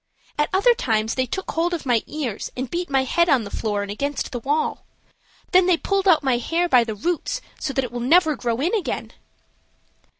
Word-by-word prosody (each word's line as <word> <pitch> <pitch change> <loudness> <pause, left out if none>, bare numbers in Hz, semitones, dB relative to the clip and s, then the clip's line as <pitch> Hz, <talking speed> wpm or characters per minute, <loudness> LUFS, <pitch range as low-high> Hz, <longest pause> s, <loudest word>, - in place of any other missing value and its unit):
At 295 0 0
other 405 +6 +4
times 220 - 0
they 260 -1 -1
took 380 +10 -4
hold 345 +2 0
of 320 - -7
my 240 -4 +2
ears 265 -9 -4
and 255 -1 -4
beat 350 +1 -3
my 270 -1 +2
head 340 +6 +2
on 265 -6 +4
the 200 - -8
floor 205 -2 -2
and 200 - -5
against 280 +7 -3
the 245 - -3
wall. 290 +6 -1 0.7
Then 365 -1 +5
they 360 -2 +4
pulled 395 +2 -1
out 330 -5 +5
my 255 -3 +2
hair 335 +7 0
by 250 -7 +5
the 220 -2 -5
roots, 345 - -2 0.2
so 290 - -2
that 270 - 0
it 245 - -5
will 240 - -4
never 310 +5 +4
grow 235 -2 -2
in 340 +8 0
again." 415 -7 -2
280 Hz, 220 wpm, -22 LUFS, 240-345 Hz, 0.7 s, Then